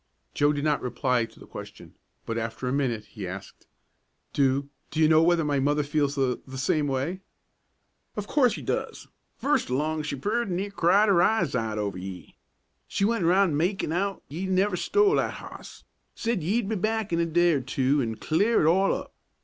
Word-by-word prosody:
Joe 145 Hz, +1 st, +3 dB
did 145 Hz, -1 st, -2 dB
not 150 Hz, -1 st, +1 dB
reply 125 Hz, -1 st, 0 dB
to -, -, -18 dB
the -, -, -12 dB
question, -, -, -10 dB, 0.3 s
but 115 Hz, -, -3 dB
after 115 Hz, +2 st, -3 dB
a 125 Hz, -, 0 dB
minute 120 Hz, -6 st, -1 dB
he 105 Hz, -3 st, -7 dB
asked, 100 Hz, +2 st, -9 dB, 0.7 s
"Do 140 Hz, 0 st, +2 dB, 0.2 s
do 155 Hz, -, -4 dB
you 155 Hz, -, +6 dB
know 160 Hz, 0 st, +5 dB
whether 170 Hz, 0 st, +3 dB
my 145 Hz, -2 st, +1 dB
mother 145 Hz, +2 st, +1 dB
feels 145 Hz, -1 st, 0 dB
the 130 Hz, -3 st, 0 dB
the 130 Hz, 0 st, -8 dB
same 145 Hz, +3 st, +1 dB
way?" 140 Hz, +8 st, -2 dB, 0.9 s
"Of 210 Hz, -, -3 dB
course 255 Hz, 0 st, +3 dB
she -, -, -6 dB
doos! -, -, -3 dB, 0.3 s
First 290 Hz, -, +1 dB
along 155 Hz, +4 st, 0 dB
she 150 Hz, -1 st, -3 dB
purty 215 Hz, -, -1 dB
near 195 Hz, +3 st, -2 dB
cried 200 Hz, +3 st, +4 dB
'er 190 Hz, -4 st, +4 dB
eyes 175 Hz, -10 st, +2 dB
out 110 Hz, -3 st, -1 dB
over 100 Hz, -3 st, -2 dB
ye. 95 Hz, -1 st, -9 dB, 0.5 s
She 200 Hz, -, 0 dB
went 220 Hz, -5 st, +1 dB
around 180 Hz, -3 st, +3 dB
makin' 175 Hz, 0 st, 0 dB
out't 195 Hz, +3 st, -1 dB
ye 170 Hz, +7 st, -4 dB
never 190 Hz, +1 st, +2 dB
stole 410 Hz, -, +3 dB
that -, -, 0 dB
hoss; -, -, -11 dB, 0.3 s
said 230 Hz, -5 st, -1 dB
ye'd 200 Hz, +7 st, 0 dB
be 220 Hz, -, -1 dB
back 215 Hz, 0 st, -1 dB
in 170 Hz, -, +2 dB
a 170 Hz, -, +2 dB
day 175 Hz, +1 st, +3 dB
or 140 Hz, -, 0 dB
two 135 Hz, +2 st, +1 dB
an' 115 Hz, -3 st, -2 dB
clear 200 Hz, -, +2 dB
it -, -, +3 dB
all 190 Hz, +4 st, +4 dB
up. -, -, -7 dB
155 Hz, 200 wpm, -26 LUFS, 130-195 Hz, 0.9 s, you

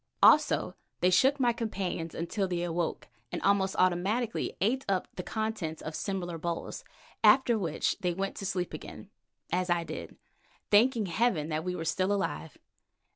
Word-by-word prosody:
Also -, -, +5 dB, 0.3 s
they 180 Hz, -, +3 dB
shook 265 Hz, +10 st, +4 dB
my 240 Hz, -2 st, +3 dB
companions 195 Hz, -8 st, -3 dB
until 190 Hz, +4 st, -1 dB
they 175 Hz, -1 st, -2 dB
awoke 170 Hz, -1 st, -2 dB, 0.2 s
and -, -, -2 dB
almost 195 Hz, -1 st, +2 dB
automatically 195 Hz, +6 st, +1 dB
ate 250 Hz, +7 st, +1 dB
up 190 Hz, -2 st, 0 dB
the -, -, -3 dB
contents 215 Hz, -6 st, -3 dB
of 155 Hz, -, -6 dB
similar 175 Hz, -4 st, -3 dB
bowls, 170 Hz, +1 st, -4 dB, 0.4 s
after 260 Hz, -3 st, +6 dB
which 170 Hz, -8 st, 0 dB
they 180 Hz, -, 0 dB
went 195 Hz, +1 st, -2 dB
to 195 Hz, -, -5 dB
sleep 180 Hz, -2 st, -2 dB
again, -, -, -9 dB, 0.4 s
as 180 Hz, +1 st, 0 dB
I 175 Hz, -1 st, +2 dB
did, -, -, -7 dB, 0.6 s
thanking 225 Hz, +1 st, +4 dB
heaven 175 Hz, -4 st, +1 dB
that 155 Hz, 0 st, -1 dB
we 180 Hz, 0 st, -2 dB
were 175 Hz, -, -5 dB
all -, -, -4 dB
still 185 Hz, +4 st, +1 dB
alive. 80 Hz, -, -2 dB
185 Hz, 165 wpm, -30 LUFS, 170-215 Hz, 0.6 s, after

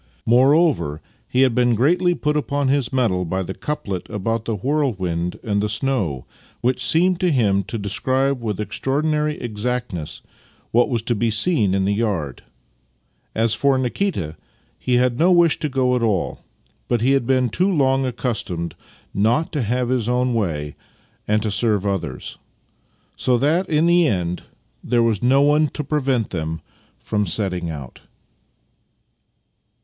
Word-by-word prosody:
Moreover, 130 Hz, -, +3 dB, 0.3 s
he 130 Hz, -, +1 dB
had 130 Hz, -3 st, +4 dB
been 120 Hz, 0 st, +3 dB
greatly 175 Hz, -, +2 dB
put 150 Hz, -2 st, -1 dB
upon 145 Hz, -2 st, 0 dB
his 135 Hz, -3 st, +1 dB
mettle 115 Hz, -9 st, +1 dB
by 95 Hz, +2 st, -2 dB
the 95 Hz, -, -5 dB
couplet 100 Hz, -, -4 dB
about 115 Hz, +2 st, -2 dB
the 115 Hz, -, -1 dB
whirlwind 95 Hz, -, -1 dB
and 100 Hz, -2 st, 0 dB
the 105 Hz, -, -1 dB
snow, 105 Hz, -, -1 dB, 0.4 s
which 125 Hz, +1 st, 0 dB
seemed 175 Hz, +5 st, +3 dB
to 180 Hz, -, +2 dB
him 105 Hz, -9 st, +2 dB
to 115 Hz, -, -5 dB
describe 130 Hz, +6 st, -1 dB
with 105 Hz, -4 st, -3 dB
ex 105 Hz, -1 st, -4 dB
traorchnary 150 Hz, +2 st, 0 dB
exactness 115 Hz, -7 st, -4 dB, 0.5 s
what 120 Hz, +5 st, +3 dB
was 115 Hz, -4 st, -1 dB
to 120 Hz, -, 0 dB
be 115 Hz, +1 st, 0 dB
seen 110 Hz, -, +2 dB
in 95 Hz, -1 st, +1 dB
the 100 Hz, -, +1 dB
yard. 100 Hz, -, -2 dB, 0.9 s
As 115 Hz, 0 st, +2 dB
for 140 Hz, -1 st, +2 dB
Nikita, 125 Hz, -, -2 dB, 0.4 s
he 125 Hz, -, 0 dB
had 125 Hz, 0 st, +2 dB
no 175 Hz, +3 st, +4 dB
wish 170 Hz, -3 st, +4 dB
to 150 Hz, -, -2 dB
go 130 Hz, -1 st, +1 dB
at 125 Hz, -, 0 dB
all, 105 Hz, -7 st, 0 dB, 0.5 s
but 120 Hz, -2 st, 0 dB
he 130 Hz, +3 st, +3 dB
had 135 Hz, -4 st, +1 dB
been 130 Hz, -2 st, +2 dB
too 180 Hz, -, +1 dB
long 135 Hz, -5 st, +2 dB
accustomed 115 Hz, -9 st, -3 dB, 0.4 s
not 115 Hz, +11 st, +1 dB
to 145 Hz, -, -1 dB
have 120 Hz, +2 st, -1 dB
his 125 Hz, -3 st, 0 dB
own 125 Hz, 0 st, +1 dB
way 75 Hz, -10 st, -2 dB, 0.5 s
and 105 Hz, 0 st, +1 dB
to 110 Hz, -, -1 dB
serve 105 Hz, -1 st, 0 dB
others; 85 Hz, -9 st, -3 dB, 0.8 s
so 125 Hz, -1 st, +1 dB
that 160 Hz, +9 st, +1 dB
in 155 Hz, 0 st, +2 dB
the 170 Hz, -1 st, +4 dB
end 90 Hz, -6 st, -1 dB, 0.4 s
there 120 Hz, -1 st, +2 dB
was 110 Hz, -4 st, +1 dB
no 135 Hz, +3 st, +4 dB
one 150 Hz, +1 st, +4 dB
to 150 Hz, -, -2 dB
prevent 135 Hz, -5 st, 0 dB
them 80 Hz, -2 st, -3 dB, 0.4 s
from 105 Hz, -2 st, -2 dB
setting 90 Hz, -2 st, -1 dB
out. 70 Hz, -6 st, -8 dB
120 Hz, 160 wpm, -21 LUFS, 100-135 Hz, 0.9 s, had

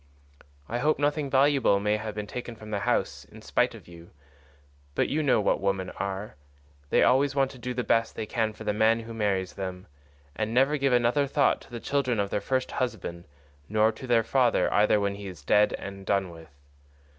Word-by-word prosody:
I 120 Hz, -, -2 dB
hope 150 Hz, +4 st, +2 dB
nothing 145 Hz, 0 st, 0 dB
valuable 135 Hz, -6 st, +3 dB
may 105 Hz, +1 st, +1 dB
have 110 Hz, -1 st, -6 dB
been 105 Hz, -1 st, -4 dB
taken 120 Hz, +2 st, -7 dB
from 110 Hz, -1 st, -11 dB
the 105 Hz, -, -1 dB
house -, -, -1 dB
in -, -, -15 dB
spite -, -, +1 dB
of -, -, -14 dB
you, 85 Hz, 0 st, -13 dB, 0.9 s
but -, -, +1 dB
you 155 Hz, -, 0 dB
know 140 Hz, -6 st, +3 dB
what 105 Hz, -, +1 dB
women 95 Hz, -1 st, -1 dB
are—they 70 Hz, -8 st, -4 dB
always 135 Hz, +2 st, +3 dB
want 135 Hz, -1 st, +2 dB
to 130 Hz, -, -13 dB
do 125 Hz, +1 st, -4 dB
the 125 Hz, -, -1 dB
best 115 Hz, -1 st, +1 dB
they -, -, -4 dB
can 110 Hz, -1 st, -1 dB
for 105 Hz, -, -11 dB
the 105 Hz, -, 0 dB
man 110 Hz, +2 st, +3 dB
who 115 Hz, 0 st, -9 dB
marries 100 Hz, -4 st, -1 dB
them, 95 Hz, -1 st, -6 dB, 0.5 s
and 110 Hz, +5 st, -2 dB
never 135 Hz, +4 st, +3 dB
give 135 Hz, -1 st, +1 dB
another 125 Hz, +4 st, +2 dB
thought 140 Hz, 0 st, +2 dB
to -, -, -16 dB
the 120 Hz, -2 st, -6 dB
children 130 Hz, -3 st, 0 dB
of 100 Hz, -1 st, -1 dB
their 100 Hz, -, -1 dB
first 130 Hz, -1 st, -1 dB
husband, 90 Hz, -9 st, -4 dB, 0.4 s
nor 110 Hz, +1 st, +3 dB
to 130 Hz, +4 st, -10 dB
their 115 Hz, -2 st, +3 dB
father 125 Hz, 0 st, +2 dB
either 105 Hz, 0 st, +4 dB
when 100 Hz, -1 st, 0 dB
he 100 Hz, 0 st, -8 dB
is 90 Hz, -6 st, -10 dB
dead 105 Hz, +4 st, +4 dB
and 100 Hz, 0 st, -7 dB
done 95 Hz, -3 st, +1 dB
with. 80 Hz, -1 st, -13 dB
110 Hz, 205 wpm, -27 LUFS, 100-130 Hz, 0.9 s, either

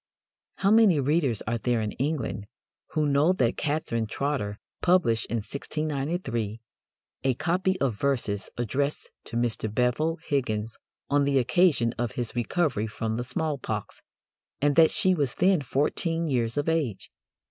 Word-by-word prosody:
How 195 Hz, -, +2 dB
many 215 Hz, -8 st, +6 dB
readers 140 Hz, -5 st, +1 dB
are 115 Hz, +1 st, -2 dB
there 120 Hz, 0 st, +1 dB
in 105 Hz, -1 st, -2 dB
England 130 Hz, -7 st, -2 dB, 0.5 s
who 155 Hz, -1 st, +2 dB
know 145 Hz, +5 st, +4 dB
that 120 Hz, -10 st, +1 dB
Catherine 145 Hz, -7 st, -1 dB
Trotter 120 Hz, -5 st, -2 dB, 0.2 s
"published 165 Hz, -12 st, +3 dB
in -, -, -2 dB
1693 140 Hz, -, -3 dB, 0.6 s
a 135 Hz, -1 st, +3 dB
copy 185 Hz, +5 st, 0 dB
of 135 Hz, -4 st, +1 dB
verses 115 Hz, -8 st, 0 dB
addressed 140 Hz, +5 st, -2 dB
to 115 Hz, -, -4 dB
Mr. 115 Hz, -2 st, -1 dB
Bevil 125 Hz, +8 st, +1 dB
Higgons 110 Hz, -6 st, -1 dB, 0.4 s
on 145 Hz, 0 st, +4 dB
the 140 Hz, -1 st, +2 dB
occasion 130 Hz, -3 st, +3 dB
of 120 Hz, -3 st, -1 dB
his 120 Hz, -2 st, -4 dB
recovery 120 Hz, -, 0 dB
from 110 Hz, +1 st, -3 dB
the 120 Hz, -, -2 dB
smallpox," 145 Hz, +1 st, -3 dB, 0.6 s
and 145 Hz, 0 st, +2 dB
that 165 Hz, -1 st, +7 dB
"she 190 Hz, -3 st, +2 dB
was 145 Hz, -7 st, 0 dB
then 185 Hz, -3 st, +3 dB
fourteen 165 Hz, +5 st, 0 dB
years 120 Hz, -4 st, 0 dB
of 145 Hz, -, 0 dB
age"? 155 Hz, -11 st, -1 dB
140 Hz, 145 wpm, -27 LUFS, 115-160 Hz, 0.6 s, that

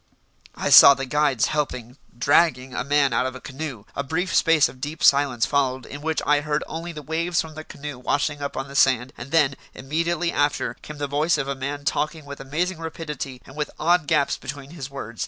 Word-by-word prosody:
I -, -, -2 dB
saw 140 Hz, -, +10 dB
the 135 Hz, -, -4 dB
guides 140 Hz, -3 st, +2 dB
helping 125 Hz, -5 st, -3 dB, 0.2 s
dragging 130 Hz, -1 st, +2 dB
a -, -, -2 dB
man 140 Hz, -2 st, +2 dB
out 125 Hz, +2 st, +1 dB
of 130 Hz, -, -6 dB
a -, -, -8 dB
canoe. 135 Hz, -5 st, -7 dB
A -, -, -1 dB
brief 160 Hz, +6 st, -2 dB
space 165 Hz, -3 st, +4 dB
of 125 Hz, +1 st, -14 dB
deep 150 Hz, +3 st, -5 dB
silence 140 Hz, -4 st, +4 dB
followed 130 Hz, -3 st, 0 dB
in 145 Hz, -, -9 dB
which 160 Hz, +1 st, -1 dB
I 145 Hz, 0 st, +3 dB
heard 150 Hz, 0 st, -1 dB
only 165 Hz, +2 st, -6 dB
the 150 Hz, -2 st, -9 dB
waves 165 Hz, +3 st, -1 dB
from 160 Hz, -1 st, -3 dB
the 155 Hz, 0 st, -8 dB
canoe 145 Hz, -4 st, -8 dB
washing 145 Hz, +3 st, -1 dB
up 140 Hz, -, -4 dB
on 135 Hz, +1 st, -3 dB
the 140 Hz, -, -11 dB
sand; 130 Hz, -2 st, +3 dB
and 120 Hz, +3 st, -9 dB
then, 150 Hz, -3 st, +3 dB, 0.2 s
immediately 170 Hz, +5 st, -1 dB
after, 145 Hz, 0 st, 0 dB
came 150 Hz, -, -9 dB
the 145 Hz, -, -2 dB
voice 150 Hz, +4 st, +1 dB
of 135 Hz, -2 st, -2 dB
a 140 Hz, -, -1 dB
man 140 Hz, +2 st, -5 dB
talking 155 Hz, +1 st, -1 dB
with 140 Hz, 0 st, -9 dB
amazing 165 Hz, +6 st, -2 dB
rapidity 150 Hz, -5 st, -6 dB
and 135 Hz, -, -14 dB
with 150 Hz, -1 st, -2 dB
odd 170 Hz, -1 st, +2 dB
gaps 140 Hz, -, +2 dB
between 140 Hz, +1 st, -8 dB
his 145 Hz, -6 st, -7 dB
words. 115 Hz, -5 st, -8 dB
145 Hz, 215 wpm, -23 LUFS, 135-155 Hz, 0.2 s, saw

